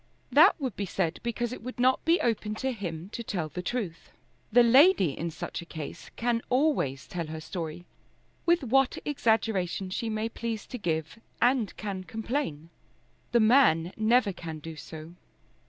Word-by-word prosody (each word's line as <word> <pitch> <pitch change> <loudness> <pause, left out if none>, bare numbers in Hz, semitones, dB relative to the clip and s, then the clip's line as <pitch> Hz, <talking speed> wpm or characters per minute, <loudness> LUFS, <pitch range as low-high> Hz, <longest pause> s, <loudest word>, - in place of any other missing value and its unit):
That - - +6
would 260 -7 -3
be 200 - -3
said 175 -2 -1
because 240 0 -2
it - - -8
would 250 +2 -7
not 255 +1 +3
be 335 +2 +4
open 215 -2 0
to 265 +4 -1
him 180 -6 -5
to 235 - -6
tell 180 -8 -3
the 180 - -5
truth. 180 -4 -4 0.4
The 240 +2 +7
lady 260 - +6
in 170 - -3
such 175 +2 -6
a - - -8
case 160 -4 -8
can 235 0 0
always 250 - +1
tell 170 -3 -4
her 160 0 -6
story, 165 0 -6 0.6
with 340 -2 +3
what 265 +1 +2
exaggeration 220 -9 0
she 225 +4 -2
may 215 0 -1
please 230 -1 -4
to 250 - -7
give, 160 +1 -2 0.2
and 245 -4 +2
can 195 -3 -4
complain. 220 - -3 0.6
The 235 - +4
man 215 - +4
never 220 -1 +3
can 165 -3 -7
do 160 +1 -8
so. 160 +1 -9
215 Hz, 170 wpm, -28 LUFS, 170-245 Hz, 0.6 s, The